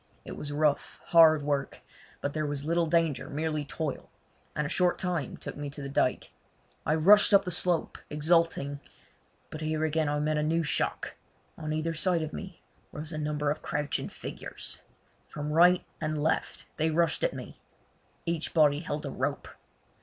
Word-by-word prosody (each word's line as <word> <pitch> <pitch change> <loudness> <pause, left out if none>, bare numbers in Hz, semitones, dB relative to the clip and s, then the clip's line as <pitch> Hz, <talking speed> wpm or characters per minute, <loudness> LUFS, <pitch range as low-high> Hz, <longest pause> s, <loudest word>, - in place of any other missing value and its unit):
It - - -7
was 145 - -6
rough, 150 0 0
hard 160 -3 +7
work, 140 -1 -2 0.4
but 145 - -2
there 155 -1 -1
was 145 -1 -3
little 170 +1 +2
danger, 160 -4 +1
merely 155 0 -1
toil; 145 0 -4 0.5
and 150 - 0
a - - -1
short 180 +3 +2
time 175 -7 -2
took - - -7
me 145 0 -5
to 145 - -9
the 140 -1 -5
dyke. 130 - +1 0.6
I 155 - +3
rushed 200 +6 +7
up 200 - +5
the 180 - -2
slope 175 -1 0
exulting; 150 -2 +1 0.7
but 155 - -6
here 155 0 0
again 155 -1 +1
I 150 0 0
met 150 0 +1
a - - +1
new 165 +2 +1
shock. 150 - -1 0.4
On 155 -1 -5
either 155 +2 -1
side 170 0 +2
of 155 - -5
me 190 -3 -8 0.3
rose 155 +2 -6
a 155 - -4
number 150 -1 0
of 155 - -4
crouching 150 -1 -2
figures. - - -6 0.5
From 150 0 -5
right 175 +2 +5 0.2
and 155 -1 -1
left 155 +2 -1
they 160 +1 +2
rushed 165 +1 +1
at - - +1
me. - - -9 0.7
Each 170 -1 -2
body 150 -2 +5
held 150 -2 -4
a 140 - -4
rope. 140 +3 -2
155 Hz, 175 wpm, -29 LUFS, 145-165 Hz, 0.7 s, hard